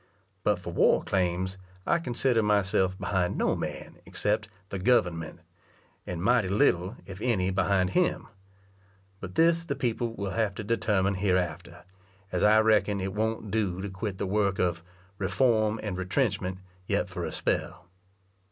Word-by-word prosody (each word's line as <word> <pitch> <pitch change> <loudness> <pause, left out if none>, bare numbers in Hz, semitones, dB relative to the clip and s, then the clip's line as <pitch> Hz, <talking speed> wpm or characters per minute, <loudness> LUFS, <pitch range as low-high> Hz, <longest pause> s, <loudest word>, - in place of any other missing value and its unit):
But 105 -2 +2
for 90 -1 -7
war - - +4
claims, 95 0 -1 0.3
I 170 - +2
consider 125 -4 +1
myself 95 -3 +2
behind 90 -3 -1
no - - +1
man - - -6
except 105 +1 -1 0.2
"the 100 - -4
government," 90 -7 +1 0.7
and 85 -1 -4
mighty 120 -2 +3
little, 95 0 +2
if 95 +1 -9
any, 95 -7 +1
behind 95 -1 +1
him; 180 -1 +1 0.9
but 90 -1 -8
this 165 0 +4
the 140 -4 -3
people 120 -3 -2
will 100 -2 -3
have 105 -1 0
to - - -5
determine 100 -3 +1
hereafter, 90 -3 -1 0.5
as - - -1
I 110 +1 +6
reckon 105 -2 +3
it 95 0 -3
won't 110 0 -2
do 100 -4 0
to 100 +1 -4
quit 95 0 -4
the 100 - -2
work 100 0 +1
of 85 -2 0 0.4
"reform 110 +1 +2
and 105 -4 -3
retrenchment" 95 -1 -1 0.3
yet - - 0
for - - -5
a - - -3
spell. 75 - -2
100 Hz, 150 wpm, -28 LUFS, 95-110 Hz, 0.9 s, I